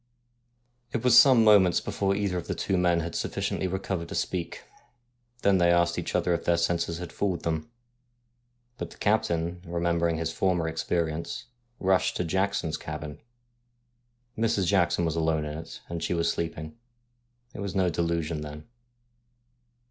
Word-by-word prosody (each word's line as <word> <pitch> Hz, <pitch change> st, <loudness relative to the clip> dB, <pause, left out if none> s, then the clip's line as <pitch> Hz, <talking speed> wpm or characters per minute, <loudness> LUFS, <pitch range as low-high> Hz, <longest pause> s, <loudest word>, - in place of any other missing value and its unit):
It 115 Hz, -, -1 dB
was 125 Hz, -2 st, +5 dB
some 125 Hz, -2 st, +8 dB
moments 100 Hz, -5 st, +6 dB
before 100 Hz, -1 st, -1 dB
either 100 Hz, -2 st, -1 dB
of -, -, -9 dB
the -, -, -2 dB
two 95 Hz, -, -1 dB
men 90 Hz, -2 st, +2 dB
had 85 Hz, 0 st, -5 dB
sufficiently 95 Hz, -, -2 dB
recovered 95 Hz, -2 st, -3 dB
to -, -, -5 dB
speak. 90 Hz, -3 st, -3 dB, 0.8 s
Then 100 Hz, -2 st, +4 dB
they 85 Hz, 0 st, +4 dB
asked 85 Hz, 0 st, +2 dB
each -, -, -4 dB
other 90 Hz, -, +2 dB
if 85 Hz, -, -2 dB
their 85 Hz, -, +2 dB
senses 85 Hz, 0 st, 0 dB
had 90 Hz, -1 st, -7 dB
fooled 95 Hz, -5 st, -1 dB
them. 80 Hz, +1 st, -2 dB, 1.1 s
But -, -, -4 dB
the -, -, -15 dB
captain, 85 Hz, -5 st, 0 dB
remember 85 Hz, -1 st, 0 dB
ing 80 Hz, -, -1 dB
his 80 Hz, 0 st, -2 dB
former 90 Hz, -3 st, +1 dB
experience, 80 Hz, 0 st, -2 dB, 0.3 s
rushed 95 Hz, -1 st, +2 dB
to -, -, 0 dB
Jackson's 90 Hz, -2 st, -1 dB
cabin. 75 Hz, -1 st, -7 dB, 1.1 s
Mrs. 110 Hz, -3 st, +1 dB
Jackson 85 Hz, -2 st, +2 dB
alone 80 Hz, -1 st, 0 dB
was 75 Hz, 0 st, -4 dB
in 75 Hz, -, -5 dB
it, 80 Hz, -, -10 dB
and 85 Hz, -1 st, -5 dB
she -, -, 0 dB
was 85 Hz, 0 st, +1 dB
sleeping. 80 Hz, -2 st, -4 dB, 0.8 s
It -, -, -9 dB
was 100 Hz, -2 st, -4 dB
no 95 Hz, -2 st, +2 dB
delusion 85 Hz, -2 st, -1 dB
then. 75 Hz, 0 st, -8 dB
85 Hz, 160 wpm, -27 LUFS, 80-95 Hz, 1.1 s, some